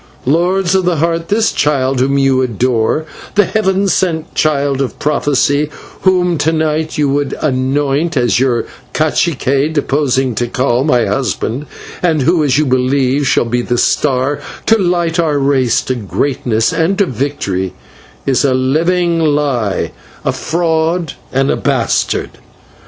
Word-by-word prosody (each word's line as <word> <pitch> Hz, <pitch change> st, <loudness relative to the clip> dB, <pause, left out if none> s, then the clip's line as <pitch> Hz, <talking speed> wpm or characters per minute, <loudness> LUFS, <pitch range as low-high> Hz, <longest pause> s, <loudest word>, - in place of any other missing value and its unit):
Lords 175 Hz, +6 st, +1 dB
of 190 Hz, -1 st, +2 dB
the 175 Hz, -1 st, +1 dB
Heart, 165 Hz, +1 st, -1 dB
this 220 Hz, +4 st, +2 dB
child 135 Hz, -3 st, 0 dB
whom 135 Hz, +2 st, +1 dB
you 135 Hz, -1 st, +3 dB
adore, 125 Hz, +4 st, 0 dB, 0.3 s
the 205 Hz, -, +4 dB
Heaven 195 Hz, -2 st, 0 dB
sent 165 Hz, -3 st, -1 dB
Child 140 Hz, -3 st, +1 dB
of 135 Hz, -, -3 dB
prophecy, 145 Hz, 0 st, +1 dB, 0.3 s
whom 180 Hz, -3 st, +2 dB
to 160 Hz, -, +2 dB
night 155 Hz, 0 st, -1 dB
you 150 Hz, -1 st, +2 dB
would 145 Hz, 0 st, -1 dB
anoint 140 Hz, +3 st, 0 dB
as 120 Hz, -1 st, +2 dB
your 125 Hz, -3 st, +1 dB, 0.3 s
/cacique/, 150 Hz, -2 st, +1 dB
deposing 135 Hz, -4 st, 0 dB
Tikal, 120 Hz, +2 st, 0 dB
my 125 Hz, -6 st, +2 dB
husband, 130 Hz, +2 st, -2 dB, 0.3 s
and 160 Hz, -5 st, +1 dB
who, 165 Hz, +2 st, +2 dB
as 140 Hz, -2 st, +2 dB
you 155 Hz, -, +2 dB
believe, 130 Hz, +1 st, +1 dB
shall 140 Hz, -, +2 dB
be 120 Hz, +1 st, -1 dB
the 120 Hz, 0 st, -1 dB
star 135 Hz, +2 st, +1 dB, 0.3 s
to 225 Hz, -, +5 dB
light 175 Hz, -2 st, 0 dB
our 155 Hz, -3 st, +1 dB
race 135 Hz, -4 st, +2 dB
to 130 Hz, -, -2 dB
greatness 115 Hz, 0 st, -1 dB
and 170 Hz, +4 st, +1 dB
to 200 Hz, -, +3 dB
victory, 105 Hz, -, -3 dB, 0.5 s
is 135 Hz, 0 st, +2 dB
a 135 Hz, -2 st, +2 dB
living 165 Hz, +6 st, +1 dB
lie, 145 Hz, -, 0 dB, 0.3 s
a -, -, +2 dB
fraud, 165 Hz, 0 st, -1 dB, 0.2 s
and 135 Hz, +1 st, +1 dB
a -, -, +1 dB
bastard!" -, -, -1 dB
145 Hz, 145 wpm, -14 LUFS, 130-165 Hz, 0.5 s, to